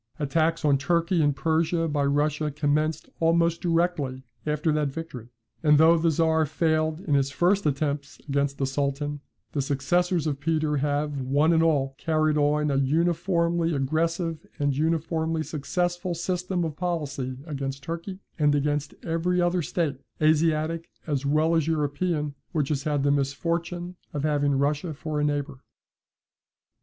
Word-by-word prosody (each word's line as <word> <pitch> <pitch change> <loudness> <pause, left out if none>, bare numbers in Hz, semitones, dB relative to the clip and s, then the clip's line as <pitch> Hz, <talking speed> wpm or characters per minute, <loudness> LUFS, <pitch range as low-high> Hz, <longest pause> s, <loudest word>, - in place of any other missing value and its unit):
Attacks 160 +2 0
on 140 -2 +4
Turkey 170 +4 +1
and 145 -2 +2
Persia 165 +2 +1
by 145 -2 0
Russia 150 +2 +1
commenced 150 +1 0
almost 170 0 +2
directly 165 -7 0 0.2
after 150 +1 +1
that 150 -1 +1
victory. 135 -5 -7 0.3
And 150 -2 +5
though 160 +2 +6
the 165 +1 +2
Czar 160 0 +2
failed 155 +1 0
in 155 - -2
his 140 -1 +3
first 175 +5 +2
attempts 140 -2 -2
against 140 0 0
the 135 - 0
Sultan, 140 +2 -2 0.3
the 145 - -1
successors 165 +5 +1
of 145 -3 -1
Peter 155 -1 0
have, 145 0 -1
one 145 +6 +3
and 165 - +4
all, 140 -5 +2
carried 155 -1 +1
on 150 0 +2
an 135 0 +2
uniformly 170 +2 +1
aggressive 165 +4 -1
and 145 -2 0
uniformly 160 +1 0
successful 175 +4 -2
system 180 +1 -1
of 155 -3 -4
policy 145 -7 -3
against 135 -3 -4
Turkey, 170 +5 -6 0.2
and 145 -1 +4
against 145 0 -1
every 175 +2 0
other 175 0 +2
state, 150 -3 -2 0.2
Asiatic 155 +1 +2 0.2
as 140 -3 -1
well 155 +3 +2
as 160 -2 +2
European, 150 0 -1 0.2
which 150 -5 0
has 140 -3 -1
had 145 -2 0
the 140 - +3
misfortune 170 +5 -2 0.2
of 145 - -2
having 145 -2 +2
Russia 145 +4 0
for 150 +1 -3
a - - +1
neighbour. 145 -2 -1
155 Hz, 150 wpm, -26 LUFS, 145-165 Hz, 0.3 s, though